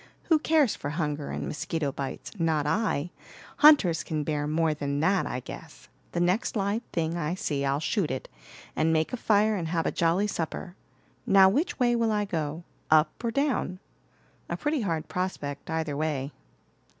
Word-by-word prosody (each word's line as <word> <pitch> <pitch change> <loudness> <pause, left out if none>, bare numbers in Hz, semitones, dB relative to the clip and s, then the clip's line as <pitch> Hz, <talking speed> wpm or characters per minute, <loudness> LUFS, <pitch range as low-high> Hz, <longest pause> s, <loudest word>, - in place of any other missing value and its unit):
Who 320 -2 +5
cares 305 -6 +3
for 145 - -5
hunger 150 -2 -2
and - - -4
mosquito 150 -1 -2
bites? 135 0 -6
Not 160 -3 +1
I. 175 -1 0 0.5
Hunters 250 - +6
can 155 -2 -2
bear 150 -1 -1
more 160 +1 +1
than 145 -1 -2
that, 190 +3 +2
I 125 - -3
guess. - - -11 0.2
The 170 - -1
next 180 +8 +1
live 205 +2 0
thing 165 0 -1
I 165 +1 -1
see 145 -6 -2
I'll 140 +1 +1
shoot 155 +3 0
it, 130 0 -4 0.5
and 160 +1 +2
make 160 +4 +1
a - - +2
fire 215 -1 +3
and 170 -5 -2
have 165 0 -1
a - - +1
jolly 170 +4 +2
supper. 175 -1 -4 0.5
Now 195 -1 +7
which 295 - 0
way 240 -2 +3
will 230 -1 +1
I 210 -1 +1
go, 160 -3 -3 0.3
up 155 +6 +3
or 235 - +1
down? 255 -8 0 0.7
A - - -2
pretty 295 -2 0
hard 165 -7 -2
prospect, 165 -6 -4
either 160 -3 -2
way." 145 -2 -2
165 Hz, 175 wpm, -27 LUFS, 150-205 Hz, 0.7 s, Now